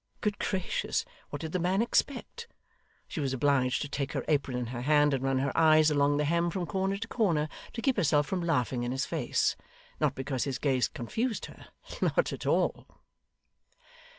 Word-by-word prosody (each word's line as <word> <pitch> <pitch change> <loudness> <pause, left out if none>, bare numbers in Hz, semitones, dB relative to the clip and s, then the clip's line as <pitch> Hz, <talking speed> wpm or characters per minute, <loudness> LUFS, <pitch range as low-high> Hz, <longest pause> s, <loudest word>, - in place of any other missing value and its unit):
Good 210 -1 -1
gracious, 185 - -1 0.2
what - - -5
did 160 - -4
the 185 - -1
man 180 +3 +1
expect! 275 - -1 0.6
She 175 - -5
was 135 -3 -1
obliged 130 -1 +2
to - - -4
take 140 -1 -3
her - - -2
apron 140 -4 +1
in 125 - -2
her 120 - -4
hand 145 +1 +4
and 135 -1 -1
run 135 0 +1
her 135 +1 -1
eyes 155 -1 +5
along 145 0 +3
the 150 - +1
hem 170 +3 +1
from 180 0 -2
corner 195 +1 -1
to 230 +3 -5
corner, 170 -11 +1 0.3
to 230 - -5
keep 265 -2 +2
herself 145 -2 +3
from 185 +3 -2
laughing 130 -7 0
in 120 0 -2
his 130 +1 -1
face; - - 0 0.4
not - - +1
because 135 -1 -2
his 135 -2 -2
gaze 130 -4 +1
confused 220 - -3
her - - -13 0.3
not - - +2
at - - -6
all. - - +1
150 Hz, 190 wpm, -29 LUFS, 135-190 Hz, 0.6 s, eyes